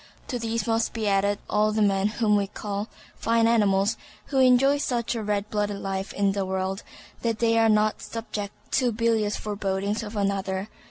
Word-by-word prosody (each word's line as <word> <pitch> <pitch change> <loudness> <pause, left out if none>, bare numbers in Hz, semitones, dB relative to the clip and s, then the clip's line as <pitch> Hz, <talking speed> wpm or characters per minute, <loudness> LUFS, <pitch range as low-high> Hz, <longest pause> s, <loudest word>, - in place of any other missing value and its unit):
To 245 - -2
these 225 -2 -2
must 225 0 0
be 220 -2 -2
added 200 0 +2
all 215 +1 +2
the 215 0 +2
men 195 -1 +2
whom 210 -1 +1
we 200 -1 +1
call 205 +1 -4 0.3
fine 230 0 +2
animals, 210 -2 +3 0.3
who 270 - +1
enjoy 265 +2 +5
such 240 -4 -1
a 230 - -3
red 205 -1 -1
blooded 205 -1 -1
life 195 0 -3
in 200 -1 +2
this 200 0 -2
world 190 +1 -2 0.4
that 230 -2 0
they 230 0 +2
are 225 0 +4
not 215 0 +2
subject 215 -3 -5 0.2
to 250 -2 +2
bilious 220 -2 +1
forebodings 200 0 -2
of 215 0 -7
another. 195 0 -1
210 Hz, 180 wpm, -25 LUFS, 200-230 Hz, 0.4 s, enjoy